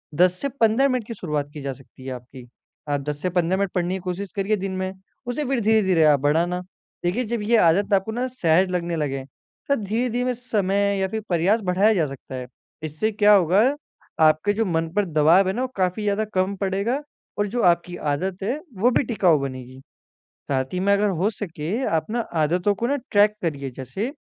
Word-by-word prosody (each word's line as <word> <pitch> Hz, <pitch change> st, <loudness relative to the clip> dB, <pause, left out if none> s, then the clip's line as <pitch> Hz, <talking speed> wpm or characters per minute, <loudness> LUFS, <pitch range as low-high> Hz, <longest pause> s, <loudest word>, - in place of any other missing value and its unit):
10 180 Hz, +2 st, +4 dB
से 280 Hz, -, -1 dB
15 240 Hz, +1 st, +3 dB
मिनट 255 Hz, -4 st, -1 dB
की 230 Hz, -, -5 dB
शुरुआत 150 Hz, -8 st, -3 dB
की 150 Hz, -, -7 dB
जा 135 Hz, -1 st, -3 dB
सकती 130 Hz, 0 st, -16 dB
है 130 Hz, -, -4 dB
आपकी। 125 Hz, 0 st, -11 dB, 0.4 s
आप 145 Hz, -1 st, 0 dB
10 145 Hz, 0 st, -4 dB
से 185 Hz, -, 0 dB
15 180 Hz, +1 st, +1 dB
मिनट 200 Hz, -2 st, -1 dB
पढ़ने 180 Hz, +1 st, 0 dB
की -, -, -4 dB
कोशिश 185 Hz, +1 st, -4 dB
करिए 200 Hz, +2 st, 0 dB
दिन 195 Hz, 0 st, -4 dB
में 185 Hz, 0 st, -2 dB, 0.4 s
उसे 265 Hz, +4 st, -2 dB
फिर 265 Hz, -1 st, 0 dB
धीरे-धीरे 200 Hz, -6 st, +3 dB
आप 150 Hz, -2 st, +5 dB
बढ़ाना। 170 Hz, +5 st, +1 dB, 0.4 s
देखिए 200 Hz, +9 st, +1 dB
जब 230 Hz, 0 st, -2 dB
ये 230 Hz, +2 st, +3 dB
आदत 195 Hz, +3 st, +3 dB
आपको 195 Hz, +3 st, +2 dB
ना 245 Hz, +3 st, -2 dB
सहज़ 185 Hz, -7 st, +2 dB
लगने 170 Hz, -1 st, -1 dB
लगे, 135 Hz, -3 st, -2 dB, 0.5 s
तो 280 Hz, -, +4 dB
धीरे-धीरे 245 Hz, +3 st, -1 dB
समय 200 Hz, -4 st, 0 dB
या 190 Hz, -, +1 dB
फ़िर 220 Hz, +3 st, -4 dB
प्रयास 190 Hz, +6 st, +2 dB
बढ़ाया 190 Hz, +4 st, +3 dB
जा 170 Hz, -6 st, +2 dB
सकता 135 Hz, -1 st, -9 dB
है। 125 Hz, -1 st, -6 dB, 0.4 s
इससे 155 Hz, +9 st, -1 dB
क्या 210 Hz, 0 st, +5 dB
होगा 190 Hz, +1 st, +4 dB, 0.6 s
आपके 155 Hz, +6 st, +3 dB
जो 225 Hz, +2 st, 0 dB
मन 165 Hz, -3 st, -1 dB
पर 205 Hz, -, +2 dB
दबाव 165 Hz, +3 st, +4 dB
है 190 Hz, -, 0 dB
ना 245 Hz, -, -2 dB
वो 260 Hz, -, 0 dB
काफ़ी 185 Hz, +3 st, 0 dB
ज़्यादा 205 Hz, +1 st, 0 dB
कम 190 Hz, +1 st, +1 dB
पड़ेगा 200 Hz, +8 st, -1 dB, 0.4 s
और 205 Hz, 0 st, +1 dB
जो 240 Hz, +3 st, -2 dB
आपकी 175 Hz, 0 st, +2 dB
आदत 185 Hz, +6 st, -2 dB
है 255 Hz, +9 st, -1 dB, 0.2 s
वो 235 Hz, +6 st, +3 dB
भी 255 Hz, -, +2 dB
टिकाऊ 185 Hz, -, +2 dB
बनेगी। 130 Hz, -1 st, -7 dB, 0.7 s
साथ 130 Hz, +3 st, -1 dB
ही 180 Hz, -, -1 dB
में 195 Hz, +2 st, +2 dB
अगर 205 Hz, +1 st, +2 dB
हो 195 Hz, +4 st, +2 dB
सके 170 Hz, -7 st, -6 dB, 0.2 s
आप 160 Hz, -1 st, 0 dB
ना 240 Hz, -, 0 dB, 0.2 s
आदतों 175 Hz, +6 st, +2 dB
को 235 Hz, +5 st, -2 dB
ना 285 Hz, -, +1 dB, 0.2 s
ट्रैक 210 Hz, +1 st, +4 dB
करिए। 140 Hz, -5 st, -2 dB
जैसे 135 Hz, -, -5 dB
190 Hz, 210 wpm, -23 LUFS, 160-215 Hz, 0.7 s, आप